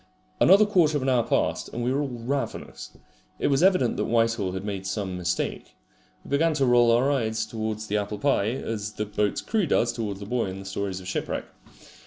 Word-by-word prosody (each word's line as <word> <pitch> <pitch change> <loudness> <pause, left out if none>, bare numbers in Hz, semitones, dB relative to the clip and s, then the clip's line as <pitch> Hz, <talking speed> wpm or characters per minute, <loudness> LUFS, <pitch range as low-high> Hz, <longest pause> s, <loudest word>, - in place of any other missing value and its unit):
Another 200 +3 +7
quarter 170 -7 +3
of 135 - -3
an 135 - +1
hour 125 -2 +3
passed, - - 0
and 120 - -4
we 125 +2 +1
were 140 - +1
all 145 - -1
ravenous. 125 +2 -5 0.4
It - - 0
was 140 +1 +2
evident 185 -10 +3
that - - 0
Whitehall 115 -5 +1
had 95 +1 -5
made 100 -2 -4
some 95 -1 -3
mistake. 90 0 -3 0.5
We - - -11
began 155 +3 +2
to 140 -2 +2
roll 120 -1 +5
our 125 +5 +3
eyes 110 -5 0
towards 110 -1 -4
the 105 0 -1
apple 105 0 -3
pie, 120 -4 +1
as 110 -4 -4
the 105 - -3
boat's 105 -1 -1
crew 215 -6 0
does 120 -4 +2
towards 105 -4 -4
the 100 - -7
boy 120 +3 -1
in 95 0 -5
the 95 - -9
stories 95 -1 -4
of 90 - -10
shipwreck. 95 - -3
115 Hz, 215 wpm, -26 LUFS, 100-135 Hz, 0.5 s, Another